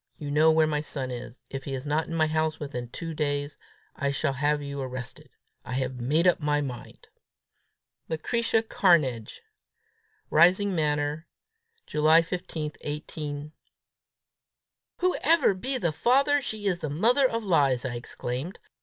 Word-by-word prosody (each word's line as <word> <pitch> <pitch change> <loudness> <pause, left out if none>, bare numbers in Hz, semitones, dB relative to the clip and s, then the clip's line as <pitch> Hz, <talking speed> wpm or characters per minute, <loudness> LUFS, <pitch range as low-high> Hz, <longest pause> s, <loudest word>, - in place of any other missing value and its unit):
You 145 -2 -5
know 155 +2 +5
where 160 0 +4
my 150 -1 0
son 135 -4 -4
is: 125 0 -8
if 135 0 -5
he 135 - -3
is 130 +2 -6
not 150 +2 0
in 165 - -4
my 160 -1 +3
house 155 0 0
within 130 -5 -5
two 165 +6 -6
days, 145 -1 -2 0.4
I 140 - -1
shall 140 +1 0
have 145 +2 +1
you 140 -1 -5
arrested. 130 -1 -7 0.3
I 125 - -7
have 130 -1 -2
made 150 +8 +2
up 180 - +4
my 150 -1 +1
mind. 130 -5 -7 1.0
"Lucretia 225 +7 0
Cairnedge. 155 - +2 0.9
"Rising 185 +5 +5
Manor, 150 0 -1 0.6
July 155 +2 +4
15, 165 -3 -4
18 150 0 -5 0.7
." - - -64
"Whoever 335 - +3
be 255 +8 -3
the 170 -9 0
father, 275 - +3
she's 205 -7 -2
the 155 - -4
mother 240 - +3
of 230 0 -2
lies!" 140 - +2
I 125 - -2
exclaimed. 125 - -5
150 Hz, 145 wpm, -27 LUFS, 140-175 Hz, 1.0 s, know